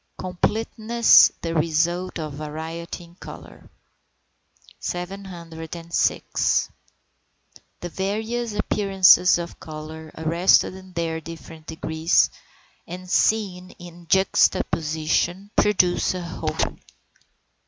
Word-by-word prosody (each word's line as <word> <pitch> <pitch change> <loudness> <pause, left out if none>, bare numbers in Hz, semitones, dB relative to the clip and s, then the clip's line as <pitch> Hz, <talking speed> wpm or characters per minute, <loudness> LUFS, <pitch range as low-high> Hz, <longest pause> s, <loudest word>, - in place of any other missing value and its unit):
COMPLETENESS 220 +5 +3
THE 165 -1 -2
RESULT 170 +3 0
OF 155 -3 -5
VARIETY 160 +4 -6
IN 170 0 -17
COLOUR. - - -12 1.1
706. 170 -3 -2 1.1
The 175 - -5
various 220 +5 -3
appearances 195 -4 +4
of 170 -1 -7
colour 155 0 -9
arrested 170 +4 +3
in 185 -1 -13
their 165 -1 -2
different 160 0 -11
degrees, 160 0 +1 0.6
and 180 +2 -8
seen 185 -2 0
in 175 -1 -13
juxtaposition, 175 0 +1
produce 185 -3 +2
a 180 - -4
whole. 170 - -4
175 Hz, 85 wpm, -23 LUFS, 160-190 Hz, 1.1 s, appearances